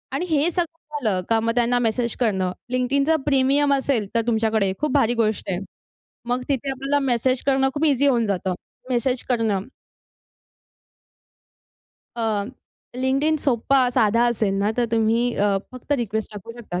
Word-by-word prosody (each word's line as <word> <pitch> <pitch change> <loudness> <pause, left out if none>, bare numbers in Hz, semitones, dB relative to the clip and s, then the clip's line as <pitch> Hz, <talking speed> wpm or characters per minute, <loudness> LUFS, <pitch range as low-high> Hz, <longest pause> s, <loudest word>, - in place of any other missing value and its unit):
आणि 355 - -1
हे 310 +1 +2
सगळं 330 -3 -4
झालं 205 -6 0
का 225 0 +3
मग 230 +1 0
त्यांना 245 0 +2
मेसेज 235 0 0
करणं. 190 -6 +1 0.2
LinkedInचा 275 +5 +2
प्रीमियम 280 +1 +3
असेल 265 -6 0
तर 230 - +4
तुमच्याकडे 220 -3 +1
खूप 300 +1 -1
भारी 240 -5 +3
गोष्ट 215 -1 -1
आहे. 180 -2 -1 0.7
मग 245 +1 0
तिथे 275 0 -1
आपल्याला 275 +2 0
मेसेज 255 0 +1
करणं 270 -1 +3
खूप 300 +2 0
ईझी 285 -2 +3
होऊन 240 -4 +2
जातं. 190 -2 -1 0.4
मेसेज 250 +1 0
करणं. 225 -5 +1 2.6
अ, 220 -3 0 0.5
LinkedIn 270 +5 +1
सोप्पा, 275 0 +1 0.2
साधा 230 -1 +3
असेल 215 -4 0
ना 200 +2 +1
तर 245 - +2
तुम्ही 230 +2 +2
अ, 200 -1 +2 0.2
फक्त 255 +3 -5
रिक्वेस्ट 220 -5 -2
टाकू 210 +2 -9
शकता. 180 -6 -5
240 Hz, 150 wpm, -22 LUFS, 220-275 Hz, 2.6 s, तर